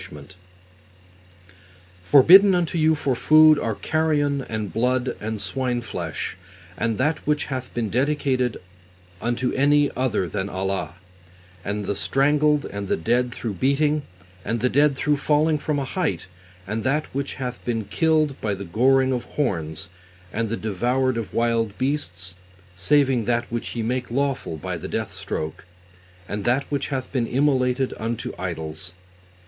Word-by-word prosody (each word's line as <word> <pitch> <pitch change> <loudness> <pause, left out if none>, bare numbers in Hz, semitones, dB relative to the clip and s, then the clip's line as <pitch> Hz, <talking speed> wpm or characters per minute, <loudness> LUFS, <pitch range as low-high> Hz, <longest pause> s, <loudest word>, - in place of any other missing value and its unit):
P: - - -10 1.9
Forbidden 185 +8 +8
unto 170 -1 0
you 160 0 +4
(for 135 -3 -1
food) 155 +3 +6
are 115 -2 -2
carrion 145 -2 0
and 110 -3 -4
blood 125 +2 0
and 110 0 -3
swineflesh, 120 -2 -3 0.4
and 115 +4 -1
that 150 +4 +1
which 150 -1 +1
hath 130 -1 -5
been 115 -4 -2
dedicated 130 -2 +1 0.6
unto 120 +2 -1
any 145 +1 +3
other 120 -8 0
than 95 +3 -3
Allah, 95 -1 -3 0.7
and 105 +1 -3
the 100 - 0
strangled, 150 +4 +2
and 100 0 -5
the - - 0
dead 120 +8 +1
through 115 -3 -4
beating, 145 - +1 0.4
and 115 +2 -2
the 125 +3 +2
dead 145 +2 +3
through 145 +2 +1
falling 150 +2 +2
from 150 0 -1
a 140 - -1
height, 180 +3 -2 0.4
and 105 +3 -3
that 150 +4 +1
which 140 +1 -3
hath 125 -2 -5
been 115 -2 -1
killed 155 -2 +1
by 105 -2 -1
(the 100 +1 -7
goring 130 +8 +3
of) 125 -2 -2
horns, 80 - -2 0.4
and 115 -1 -1
the 115 - -2
devoured 125 +5 0
of 115 -2 -4
wild 115 -3 0
beasts, 95 -11 -2 0.4
saving 130 +3 +2
that 120 +1 +1
which 120 +1 -3
ye 115 - -2
make 125 +2 -2
lawful 135 - -1
(by 75 - -4
the - - -6
death 110 -3 -3
stroke), 90 -3 -5 0.6
and 100 0 -4
that 125 +5 +2
which 140 -1 -1
hath 130 -2 -4
been 120 -4 0
immolated 130 -1 +1
unto 115 +1 -3
idols. 85 0 -2
125 Hz, 150 wpm, -23 LUFS, 110-145 Hz, 1.9 s, Forbidden